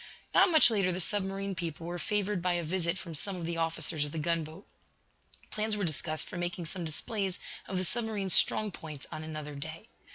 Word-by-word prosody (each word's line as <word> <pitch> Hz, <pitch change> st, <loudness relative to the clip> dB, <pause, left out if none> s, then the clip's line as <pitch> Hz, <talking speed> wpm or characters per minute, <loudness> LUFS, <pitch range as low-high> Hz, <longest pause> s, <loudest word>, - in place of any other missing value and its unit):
Not -, -, +7 dB
much 315 Hz, -7 st, +8 dB
later 195 Hz, -4 st, +2 dB
the 180 Hz, -, -2 dB
submarine 195 Hz, +1 st, 0 dB
people 165 Hz, -2 st, -5 dB
were 175 Hz, +1 st, -4 dB
favored 205 Hz, -2 st, 0 dB
by 180 Hz, 0 st, +2 dB
a 175 Hz, -1 st, 0 dB
visit 170 Hz, +1 st, 0 dB
from 170 Hz, -2 st, -7 dB
some 190 Hz, +6 st, -2 dB
of 175 Hz, -2 st, -5 dB
the 170 Hz, 0 st, -2 dB
officers 165 Hz, -1 st, 0 dB
of 145 Hz, -, -4 dB
the 165 Hz, -, -5 dB
gunboat. 165 Hz, +2 st, -2 dB, 0.9 s
Plans 215 Hz, 0 st, 0 dB
were 205 Hz, -, -1 dB
discussed 155 Hz, -1 st, 0 dB
for -, -, -6 dB
making 175 Hz, 0 st, -2 dB
some 175 Hz, +3 st, -5 dB
displays 190 Hz, +4 st, -2 dB, 0.3 s
of 190 Hz, -, -2 dB
the 185 Hz, -, 0 dB
submarine's 210 Hz, -3 st, 0 dB
strong 215 Hz, -1 st, +5 dB
points 155 Hz, -5 st, -8 dB
on 155 Hz, -, -5 dB
another 155 Hz, -1 st, -6 dB
day. 155 Hz, +9 st, -7 dB
175 Hz, 200 wpm, -31 LUFS, 160-195 Hz, 0.9 s, much